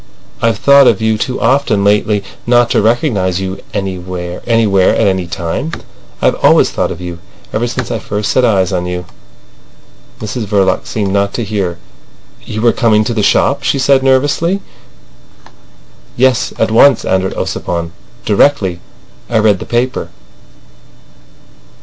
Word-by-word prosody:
I've 115 -2 +1
thought 140 +3 +5
of 105 - +3
you 110 0 +1
too 125 +4 -3
often 120 -4 +1
lately 105 0 +1 0.2
not 120 0 +3
to - - +3
recognise 105 - 0
you 95 0 -4
anywhere, 90 -2 -5
at 105 -5 +2
any 95 -2 -1
time. 85 - -4 0.5
I've - - +4
always - - +4
thought - - -1
of - - -6
you—ever 90 +6 -6
since 125 +1 -4
I 115 - -2
first 105 +1 -3
set 130 - +2
eyes 95 -5 +2
on 90 -1 -2
you." 90 0 -4 1.1
Mrs 110 +2 -4
Verloc 95 -2 +1
seemed 100 -3 -2
not 100 0 0
to 120 - -2
hear. 100 -5 -3 0.7
"You 110 - -5
were 120 - +4
coming 110 -3 +2
to 120 - -2
the 110 - -1
shop?" 140 +7 +2
she 135 +1 0
said 135 +1 +3
nervously. 145 +8 +1 1.6
"Yes; 130 0 +2
at - - 0
once," 125 +2 +5
answered 95 0 0
Ossipon. 85 -1 -3 0.3
"Directly 100 -5 +2 0.5
I 115 - +1
read 105 -3 +3
the - - -8
paper." 125 +2 -1
105 Hz, 145 wpm, -13 LUFS, 95-120 Hz, 1.6 s, thought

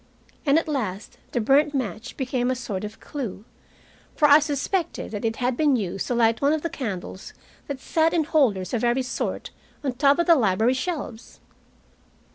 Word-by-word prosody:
And 280 +2 +5
at 330 - 0
last 215 -10 -4
the - - 0
burnt 285 +6 +3
match 230 -2 -4
became 255 -2 -1
a 255 - +1
sort 210 -6 -4
of 210 0 -7
clue, 235 -8 -6 0.7
for 300 - +5
I 290 +1 +8
suspected 310 - -2
that 205 -2 -5
it 225 0 0
had 250 +1 0
been 290 0 +3
used 195 -4 -2
to 245 - 0
light 230 -1 +2
one 285 +2 +3
of 315 - -2
the 335 - -2
candles 190 -6 -6 0.3
that 280 -2 -4
sat 320 +3 +1
in 335 -2 +2
holders 245 - +1
of 240 - 0
every 240 +2 +2
sort, 255 - -4 0.3
on 275 - 0
the 245 - -16
top 280 +1 +4
of 340 - +2
the 340 - +7
library 225 - +3
shelves. 260 -5 -5
255 Hz, 190 wpm, -24 LUFS, 225-295 Hz, 0.7 s, I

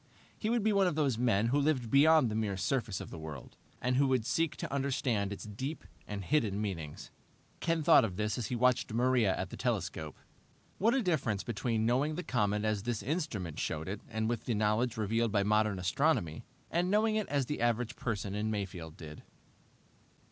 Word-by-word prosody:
He 215 - -3
would 235 -2 +1
be 215 0 +3
one 195 -2 +4
of 165 - 0
those 140 -7 +1
men 115 -2 +2
who 140 +4 +2
lived 135 -6 0
beyond 150 -3 +6
the - - -2
mere 105 -3 -1
surface 115 -2 -1
of - - -8
the - - -7
world, 80 -4 -8 0.2
and 125 +1 0
who 140 0 +4
would 130 -4 +1
seek 165 +2 0
to - - -5
understand 125 -7 0
its 100 - -6
deep 130 +9 -5 0.2
and 100 -1 -5
hidden 105 -5 +1
meanings. 85 -8 -5 0.5
Ken 165 -2 0
thought 165 +1 +7
of 100 -5 -2
this 105 +1 -1
as 120 -4 -3
he 125 - -2
watched 125 -1 +2
Maria 120 -3 +2
at - - -4
the - - -7
telescope. 80 -1 -2 0.6
What 225 +6 +3
a 265 - +1
difference 130 - 0
between 115 -1 -1
knowing 135 +6 +1
the 180 - -4
comet 105 - 0
as 110 -2 0
this 115 -1 -3
instrument 115 - -3
showed 80 +1 -2
it, 100 +2 -4
and 110 0 -1
with 120 -1 -2
the 120 - 0
knowledge 110 +3 +1
revealed 110 +1 +1
by 100 -1 +2
modern 105 -1 +2
astronomy, 90 - 0 0.3
and 175 +2 +1
knowing 215 +2 +3
it 215 -1 -1
as 140 -2 +1
the 150 0 -4
average 120 0 0
person 100 -4 -3
in 105 +1 -1
Mayfield 90 -6 -4
did. 75 -2 -9
115 Hz, 200 wpm, -32 LUFS, 100-140 Hz, 0.6 s, thought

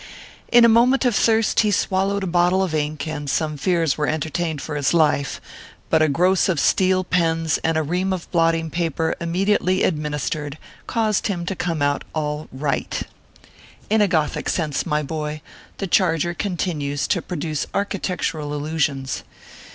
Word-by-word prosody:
In 240 -1 +7
a - - +7
moment 245 +4 +4
of 245 -4 +2
thirst 225 0 +3
he 215 - +4
swallowed 195 0 0
a 180 -2 -3
bottle 180 +2 +3
of 180 -4 -2
ink, 150 -1 -2
and 150 -2 -4
some 155 +2 0
fears 165 -1 0
were 150 - +1
entertained 160 +1 -2
for 150 - -6
his 145 +2 +1
life; 150 -4 +2 0.5
but 160 - +4
a 155 - +5
gross 180 +7 +2
of 170 -5 +1
steel 185 0 +3
pens 165 -3 +1
and 165 0 +1
a 160 - +1
ream 180 +5 -1
of 185 -2 -3
blotting 165 -2 +1
paper, 165 -1 -1
immedi 185 +5 +1
ately 185 +1 +1
administered, 150 -1 -2 0.3
caused 220 -4 0
him 175 -4 -3
to 195 - -3
come 165 -4 -2
out 145 0 +1
all 150 0 -2
write. 140 +2 -2 0.9
In 220 0 +4
a 205 - +4
gothic 160 -5 0
sense, 155 -5 -1
my 150 0 0
boy, 150 0 -4 0.3
the 195 - -3
charger 175 -2 +2
continues 155 -7 -2
to 175 - +1
produce 155 -4 -3
architectural 180 -6 -2
illusions. 145 -3 -2
165 Hz, 165 wpm, -22 LUFS, 150-185 Hz, 0.9 s, In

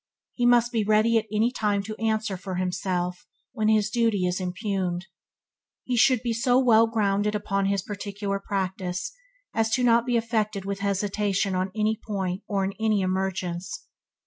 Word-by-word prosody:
he 240 -1 +1
must 240 0 +4
be 225 -3 +1
ready 215 +2 +4
at 220 - -8
any 220 +3 +2
time 205 -4 0
to 215 +1 -6
answer 220 -2 0
for 185 0 -6
himself 180 0 -2 0.2
when 215 -1 -1
his 215 -1 +3
duty 225 -5 +1
is 180 +1 -1
impugned. 185 -1 -2 0.8
He 250 - -1
should 250 0 +4
be 235 -2 0
so 245 +2 +2
well 230 -3 +5
grounded 210 -2 +1
upon 195 -1 0
his 200 -2 0
particular 200 0 -4
practice 190 - -3 0.4
as 225 +1 +1
not 240 -2 +4
to 235 - -7
be 245 -1 +2
affected 215 -4 -1
with 200 0 -3
hesitation 200 0 0
on 185 +1 -1
any 215 0 +1
point 190 -2 -3
or 195 -2 0
in 195 - -3
any 215 -2 +2
emergence. 185 -1 -2
205 Hz, 170 wpm, -26 LUFS, 190-225 Hz, 0.8 s, well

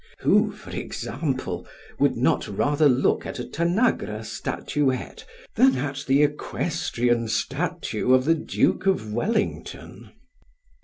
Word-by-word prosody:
Who, - - +4
for - - -12
example, 135 -1 -4 0.3
would - - +2
not - - +1
rather 145 +8 +2
look 130 0 +2
at - - -6
a 125 - -4
Tanagra 170 - 0
statuette 130 +3 -2 0.3
than 135 0 +4
at 140 +1 -3
the 135 +2 +4
equestrian 120 -5 -1
statue 135 +2 -1
of 130 0 +5
the 165 - +5
Duke 165 +3 0
of 110 - 0
Wellington? 210 - -3
135 Hz, 115 wpm, -24 LUFS, 120-160 Hz, 0.3 s, of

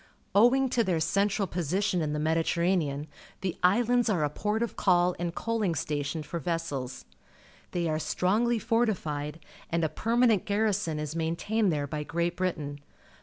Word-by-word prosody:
Owing 245 +6 +5
to 240 -1 +2
their 180 -5 0
central 200 +4 +1
position 180 +3 0
in 150 -1 -1
the 150 - -1
Mediterranean, 160 -1 +1 0.4
the 185 -3 -2
islands 235 +5 +3
are 180 -7 +1
a 145 - 0
port 210 +7 -1
of 235 - -4
call 180 -1 +3
and 175 -1 -3
cnn]inp 215 -8 -1
st:'|tinn 145 +1 -2
for 170 +3 -5
vessels. 145 -6 -3 0.6
They 175 -1 -1
are 155 -1 0
st 155 - -4
rongly 225 +5 +3
fortified, 165 -11 -1 0.3
and 170 0 0
a 160 - +2
permanent 230 +3 +2
garrison 205 -6 0
is 150 +1 -4
maintained 175 +6 0
there 145 -2 -1
by 150 +1 -4
Great 170 +3 -1
Britain. 155 -6 -2
175 Hz, 160 wpm, -28 LUFS, 155-210 Hz, 0.6 s, Owing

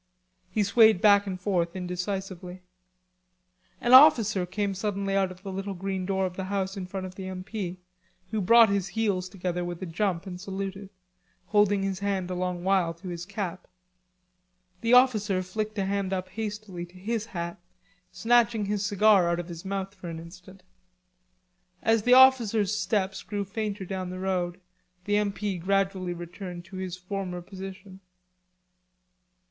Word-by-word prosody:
He 210 +3 +1
swayed 220 0 +5
back 205 0 +5
and 185 -1 -4
forth 180 -2 0
indecisively. 180 0 -5 1.2
An 240 - +2
officer 225 -9 +7
came 200 +2 -1
suddenly 195 0 -2
out 195 -1 +2
of 185 +1 -12
the 195 - -5
little 195 +1 -4
green 190 0 -3
door 190 -1 +1
of 180 -1 -4
the 190 - -3
house 195 0 -2
in 190 -2 -5
front 190 0 -5
of 185 - -8
the 185 0 -7
M.P., 185 0 -5 0.5
who 220 - 0
brought 230 +3 +7
his 200 -2 0
heels 195 -5 0
together 180 -2 -3
with 175 -1 -5
a - - -2
jump 175 +1 -1
and 180 -2 -7
saluted, 195 0 -5 0.6
holding 205 -1 +3
his 195 -1 -2
hand 195 -2 -2
a - - -1
long 180 -1 -2
while 185 -3 +2
to 180 +2 -9
his 175 0 -6
cap. 195 -3 -5 1.1
The 230 +1 +2
officer 215 -7 +4
flicked 215 +3 -4
a 195 - 0
hand 195 -1 -1
up 185 0 -3
hastily 210 -3 -5
to 175 - -22
his 225 +3 -3
hat, 170 -5 -5 0.5
snatching 225 +2 +2
his 205 0 -1
cigar 205 -3 +4
out 170 0 0
of 175 0 -6
his 170 0 -8
mouth 195 0 -3
for 185 -3 -8
an 165 - -6
instant. 180 +3 -12 1.2
As 225 -1 +3
the 245 +4 +5
officer's 230 -6 +5
steps 200 -2 -1
grew 205 -1 -4
fainter 205 -1 -4
down 185 -1 -4
the 185 - -6
road, 185 -1 -2 0.5
the 205 0 +2
M.P. 205 -2 -1
gradually 190 -1 0
returned 175 +1 -8
to 190 +2 -10
his 185 -1 -4
former 180 -1 -4
position. 190 0 -9
195 Hz, 165 wpm, -27 LUFS, 180-205 Hz, 1.2 s, officer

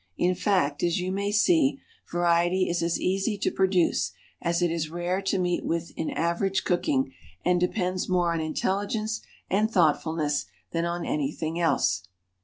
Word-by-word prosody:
In 180 +1 +2
fact, 180 -7 +1
as 175 0 +1
you 180 +1 -2
may 200 +1 -1
see, 275 - +3 0.3
variety 175 +2 +2
is 175 -1 0
as 170 0 0
easy 195 +3 0
to - - 0
produce 180 - +2 0.3
as 170 +1 +1
it 175 - +2
is 165 -2 -2
rare 175 +3 -1
to 195 0 0
meet 180 -1 0
with 170 0 -2
in 160 - -2
average 180 +4 0
cooking, 135 -7 0 0.3
and 180 0 +3
depends 180 0 -1
more 175 -2 +2
on 165 - -1
intelligence 205 +7 -1 0.3
and 210 +3 +2
thoughtfulness 160 -5 +1 0.2
than 165 0 0
on 170 0 -2
anything 155 +3 -2
else. 95 - +2
175 Hz, 160 wpm, -27 LUFS, 165-190 Hz, 0.3 s, see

